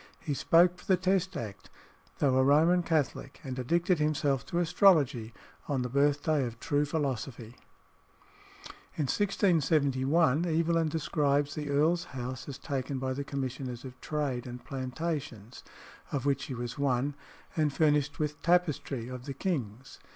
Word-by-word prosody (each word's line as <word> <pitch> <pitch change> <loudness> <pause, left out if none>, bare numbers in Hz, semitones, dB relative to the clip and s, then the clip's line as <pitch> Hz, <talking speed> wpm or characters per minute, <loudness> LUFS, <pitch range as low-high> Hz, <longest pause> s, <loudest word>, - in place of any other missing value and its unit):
He 145 - -3
spoke 175 +6 +4
for - - -15
the 185 - +4
Test 190 0 0
Act, 105 -4 -7 0.5
though 135 -3 +2
a 130 - +4
Roman 160 +6 +4
Catholic, 150 -4 -1
and 130 -1 -5
addicted 170 +6 +1
himself 150 -3 +1
to 170 - -3
astrology 150 - +3 0.4
on 135 -3 0
the 125 - -3
birthday 145 +1 +2
of 115 -2 -5
true 145 +1 +1
philosophy." 130 -6 -3 1.4
In 155 - 0
1671 155 - +2
Evelyn 165 0 +1
describes 145 -2 0
the 150 -1 -4
earl's 160 +5 +2
house 130 +3 -5
as 135 - -6
taken 135 -1 -3
by 130 0 -2
the 140 +2 -3
Commissioners 130 -3 -4
of 130 -1 -10
Trade 140 -5 -2
and 125 0 -8
Plantations, 130 -4 -5 0.5
of 140 -2 -2
which 140 -1 +1
he 130 - -5
was 120 +2 -5
one, 140 0 +1 0.4
and 155 -2 +2
furnished 150 -1 +2
with 150 -1 -3
tapestry 155 -8 +1
"of 125 0 -7
the 140 - -4
king's." 135 - -4
145 Hz, 145 wpm, -30 LUFS, 130-160 Hz, 1.4 s, spoke